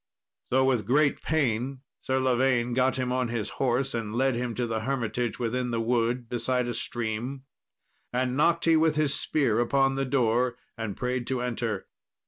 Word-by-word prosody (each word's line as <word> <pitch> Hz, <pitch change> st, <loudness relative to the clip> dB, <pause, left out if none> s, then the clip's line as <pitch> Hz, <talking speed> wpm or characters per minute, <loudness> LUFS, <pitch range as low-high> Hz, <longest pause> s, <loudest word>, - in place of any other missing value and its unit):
So 130 Hz, +1 st, +4 dB
with 120 Hz, -6 st, +1 dB
great 145 Hz, +3 st, +3 dB
pain 130 Hz, -3 st, 0 dB, 0.2 s
Sir 130 Hz, 0 st, 0 dB
Lavaine 125 Hz, -1 st, +2 dB
got 130 Hz, +1 st, +2 dB
him 130 Hz, -1 st, -1 dB
to 125 Hz, 0 st, +1 dB
his 115 Hz, -3 st, -2 dB
horse, 135 Hz, +1 st, +1 dB
and 110 Hz, -2 st, -3 dB
led 135 Hz, +1 st, +2 dB
him 120 Hz, -1 st, -3 dB
to 125 Hz, -, -1 dB
the 115 Hz, -1 st, -2 dB
hermitage 120 Hz, -2 st, -2 dB
within 125 Hz, +1 st, -1 dB
the 115 Hz, -1 st, -1 dB
wood, 120 Hz, +1 st, 0 dB
beside 125 Hz, +1 st, 0 dB
a 120 Hz, -, -2 dB
stream. 120 Hz, +4 st, -3 dB, 0.7 s
Then 125 Hz, 0 st, 0 dB
knocked 170 Hz, +4 st, +2 dB
he 165 Hz, -1 st, +5 dB
with 160 Hz, -1 st, +3 dB
his 150 Hz, -2 st, +2 dB
spear 130 Hz, -9 st, +1 dB
upon 135 Hz, +3 st, +2 dB
the 135 Hz, 0 st, -1 dB
door, 125 Hz, -2 st, +1 dB, 0.2 s
and 110 Hz, -4 st, -5 dB
prayed 125 Hz, 0 st, -2 dB
to 130 Hz, -2 st, -1 dB
enter. 115 Hz, -4 st, -2 dB
125 Hz, 175 wpm, -27 LUFS, 120-135 Hz, 0.7 s, he